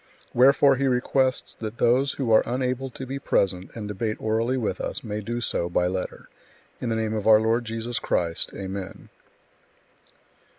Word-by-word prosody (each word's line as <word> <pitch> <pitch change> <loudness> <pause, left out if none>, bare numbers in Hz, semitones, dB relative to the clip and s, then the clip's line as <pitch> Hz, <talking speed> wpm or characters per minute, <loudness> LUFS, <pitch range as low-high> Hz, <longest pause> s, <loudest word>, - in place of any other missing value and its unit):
Wherefore 135 +2 +5
he 135 +1 +1
requests 130 0 +1
that 110 +1 -5
those 130 +4 +3
who 125 -5 -2
are 110 - +7
unable 130 +1 -1
to 130 +1 -8
be 135 +2 -5
present 95 -7 0
and 110 -3 -5
debate 110 +2 -2
orally 115 +4 0
with 105 -7 -2
us, - - -4
may 105 -2 -4
do 120 +3 -3
so 85 -6 -1
by 90 0 +1
letter. 90 0 -4 0.5
In 125 - -2
the 115 - 0
Name 110 -1 -1
our 110 0 +5
Lord 115 +2 +1
Jesus 115 +1 -3
Christ. 85 -1 -1
Amen. 95 -1 -6
115 Hz, 165 wpm, -25 LUFS, 105-125 Hz, 0.5 s, are